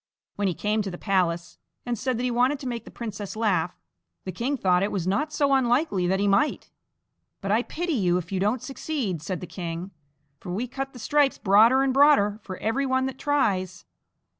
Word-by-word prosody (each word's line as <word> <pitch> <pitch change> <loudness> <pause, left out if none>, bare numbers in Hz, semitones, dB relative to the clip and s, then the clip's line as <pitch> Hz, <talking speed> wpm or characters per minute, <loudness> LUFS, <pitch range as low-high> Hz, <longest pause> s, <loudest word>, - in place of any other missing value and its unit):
When 205 -1 0
he 180 - -1
came 215 +1 0
to 200 - -3
the 175 - -7
palace, 175 -4 -1 0.3
and 245 -1 -1
said 255 +1 -2
that 245 - -3
he 250 - 0
wanted 250 +4 +2
to 265 - -5
make 235 -2 -4
the - - -10
princess 210 -4 -6
laugh, 185 -6 0 0.5
the 185 - -3
king 250 - -2
thought 185 -5 +3
that - - 0
it 205 - -3
was 185 -4 -2
not 285 +12 0
so 285 -2 +2
unlikely 245 - +2
that 190 +2 +1
he 205 - +1
might; 200 +9 +1 0.7
"but 195 - -3
I 220 +3 +3
pity 340 +6 -3
you, 180 -8 +2
if 180 0 -6
you 190 - -1
don't 210 +5 0
succeed," 265 - -3
said 180 +1 -4
the - - -5
king, 175 +1 -6 0.5
"for 180 - -7
we 220 +8 -2
cut 270 +2 -5
the - - -11
stripes 285 +4 +2
broader 225 +6 +5
and 270 -1 +1
broader 270 -7 +4
for 185 -2 -7
every 265 +5 -1
one 260 0 +1
that 265 0 -5
tries." 190 -11 0
215 Hz, 215 wpm, -25 LUFS, 185-265 Hz, 0.7 s, broader